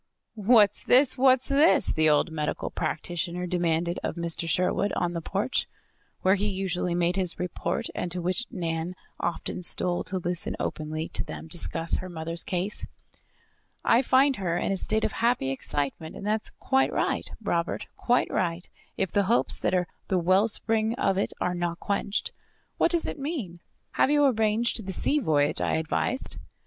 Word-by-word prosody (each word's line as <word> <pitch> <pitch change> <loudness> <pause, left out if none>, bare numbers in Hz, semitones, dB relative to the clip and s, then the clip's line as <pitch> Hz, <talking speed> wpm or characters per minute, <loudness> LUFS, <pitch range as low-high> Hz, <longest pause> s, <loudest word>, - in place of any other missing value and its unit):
"What's 215 -1 +4
this? 260 +1 +4
What's 260 -1 +4
this?" 290 +4 +4
the 155 0 +3
old 150 +3 +2
medical 150 -1 -3
practitioner 175 +2 -3
demanded 175 -1 0
of - - -3
Mr. 170 -1 -1
Sherwood, 185 +4 +1
on 175 0 -1
the 170 - -3
porch, 200 +10 -1 0.6
where 190 - +5
he 205 +1 +1
usually 185 -3 -1
made 175 +2 +1
his 185 -3 0
report, 180 +4 -3
and 175 - -3
to 180 - +1
which 185 +7 0
Nan 165 +1 -3 0.2
often 175 +1 -3
stole 175 0 +1
to 185 +2 -1
listen 175 -1 -2
openly 155 +1 -3
to - - -2
them - - -8
discuss 165 0 +2
her 185 - -6
mother's 165 0 -2
case. 185 +3 -2 1.0
"I 235 - +5
find 270 +1 +3
her 175 -3 -1
in - - -1
a - - +1
state 220 +3 +1
of - - +1
happy 230 - +1
excitement, 145 +3 -3
and - - -8
that 215 +1 +1
is - - -4
quite 265 0 +2
right, - - -1
Robert, 170 -6 -1
quite 245 +1 +1
right, 175 0 -1 0.3
if 190 -3 -1
the 200 -1 +2
hopes 230 +5 +2
that - - +1
are 180 -1 +2 0.2
the 190 - +1
wellspring 215 +5 +2
of 195 -6 +1
it - - 0
are 180 - 0
not 175 -1 -2
quenched. 200 0 -2 0.5
What - - +4
does 340 -1 +2
it - - -4
mean? 270 - -4 0.3
Have - - +2
you 290 0 +4
arranged 220 -3 +1
the 190 - -2
sea 295 +10 +2
voyage 150 - +1
I - - +1
advised?" 160 +11 -2
185 Hz, 175 wpm, -27 LUFS, 170-220 Hz, 1.0 s, where